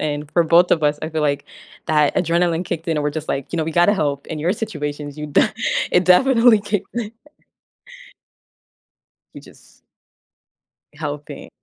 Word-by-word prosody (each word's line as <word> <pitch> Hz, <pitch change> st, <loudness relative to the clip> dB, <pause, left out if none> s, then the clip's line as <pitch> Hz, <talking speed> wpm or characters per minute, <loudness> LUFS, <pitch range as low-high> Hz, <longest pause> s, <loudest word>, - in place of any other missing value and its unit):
and 150 Hz, -1 st, -3 dB
for 170 Hz, -, +3 dB
both 170 Hz, +2 st, +4 dB
of 160 Hz, -, +2 dB
us, 150 Hz, 0 st, +1 dB
I 155 Hz, -, -4 dB
feel 160 Hz, 0 st, -2 dB
like 145 Hz, -1 st, 0 dB, 0.4 s
that 150 Hz, -2 st, +2 dB
adrenaline 170 Hz, 0 st, +1 dB
kicked 170 Hz, 0 st, -5 dB
in 160 Hz, -, 0 dB
and 150 Hz, -, -1 dB
we're 150 Hz, -, 0 dB
just, 155 Hz, 0 st, -6 dB
like, 135 Hz, -1 st, -3 dB
you 170 Hz, -, -2 dB
know, 160 Hz, -, 0 dB
"We 165 Hz, -, -4 dB
gotta 175 Hz, +5 st, +4 dB
help 145 Hz, -7 st, -2 dB
in 160 Hz, -, -5 dB
your 175 Hz, +7 st, 0 dB
situations," 150 Hz, -7 st, -5 dB
you 150 Hz, -, -5 dB
d 145 Hz, -, +3 dB, 0.5 s
it 180 Hz, 0 st, +3 dB
definitely 230 Hz, +3 st, +5 dB
kicked 205 Hz, -1 st, -3 dB
in. 230 Hz, -2 st, -4 dB, 2.2 s
You -, -, -11 dB
just -, -, -20 dB, 1.1 s
Helping. 150 Hz, -2 st, -7 dB
160 Hz, 170 wpm, -20 LUFS, 150-180 Hz, 2.2 s, definitely